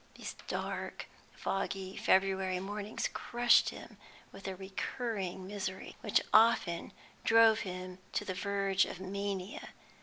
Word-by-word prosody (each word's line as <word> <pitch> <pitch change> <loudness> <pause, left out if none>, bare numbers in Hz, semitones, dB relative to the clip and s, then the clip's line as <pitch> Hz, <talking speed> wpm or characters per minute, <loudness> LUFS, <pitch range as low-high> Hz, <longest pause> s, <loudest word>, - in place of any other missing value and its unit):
These - - -6
dark, - - -3 0.3
foggy 195 0 -2
February 190 -1 +2
mornings 205 +2 -3
crushed 240 0 +4
him - - -10 0.3
with 195 - -9
a 190 - -3
recurring 190 0 -3
misery 190 -1 -5
which 210 - +3
often 215 -6 +4 0.3
drove 225 -1 +6
him 185 -1 -6
to 205 - -1
the 185 - -2
verge 195 0 +1
of 180 - -7
mania. 195 0 -4
195 Hz, 120 wpm, -33 LUFS, 185-205 Hz, 0.3 s, drove